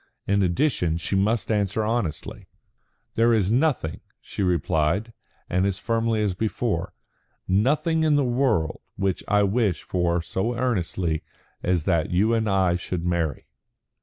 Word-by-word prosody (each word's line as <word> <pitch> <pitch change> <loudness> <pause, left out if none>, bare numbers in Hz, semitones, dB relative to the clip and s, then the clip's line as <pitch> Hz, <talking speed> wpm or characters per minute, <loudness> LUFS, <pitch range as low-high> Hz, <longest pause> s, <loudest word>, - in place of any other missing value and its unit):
In 100 +1 +2
addition, 90 - +1
she 85 +3 -2
must 105 +4 +1
answer 105 0 0
honestly. 105 - -3 0.7
"There 115 +1 +3
is 100 -2 +1
nothing," 125 - +1 0.2
she - - -6
replied, 90 +4 +1 0.3
and 90 +1 +1
as 95 -1 -2
firmly 115 0 0
as 100 -3 0
before, 105 -2 -2 0.5
"nothing 150 - +2
in 155 -2 +3
the 145 -2 +2
world 120 - 0
which 95 -1 -1
I 105 0 +3
wish 100 -4 +1
for 85 -1 0
so 115 +8 -2
earnestly 90 -9 -1 0.4
as 90 -3 +1
that 80 0 +1
you 105 +6 +2
and 110 -2 +1
I 95 -3 +2
should 90 -1 -4
marry." 85 -4 -1
100 Hz, 140 wpm, -24 LUFS, 90-115 Hz, 0.7 s, There